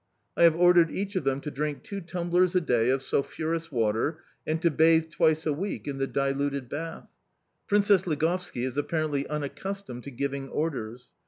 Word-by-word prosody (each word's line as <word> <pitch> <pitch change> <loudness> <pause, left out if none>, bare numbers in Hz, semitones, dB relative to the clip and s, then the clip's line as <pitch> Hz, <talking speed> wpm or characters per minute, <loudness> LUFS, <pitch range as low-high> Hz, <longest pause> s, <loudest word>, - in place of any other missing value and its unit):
I - - -1
have 165 -1 +6
ordered 175 -1 +5
each 200 +4 -4
of 185 - -1
them 135 0 0
to 150 - -5
drink 150 +1 -3
two 200 -3 -6
tumblers 175 +1 +1
a - - +6
day 120 -6 +2
of 135 0 +1
sulphurous 165 +3 -2
water, 115 +6 0 0.3
and 155 +1 0
to 170 - +4
bathe 160 +1 +4
twice 155 +1 +2
a 155 - +1
week 190 +4 -4
in 140 -1 -4
the 135 - 0
diluted 140 -1 -1
bath. 165 +2 -6 0.6
Princess 200 -2 +3
Ligovski 160 -3 -1
is 130 +1 -3
apparently 145 -2 -1
unaccustomed 150 -1 -5
to - - -5
giving 140 +1 -3
orders. 125 -6 -4
155 Hz, 175 wpm, -27 LUFS, 140-170 Hz, 0.6 s, have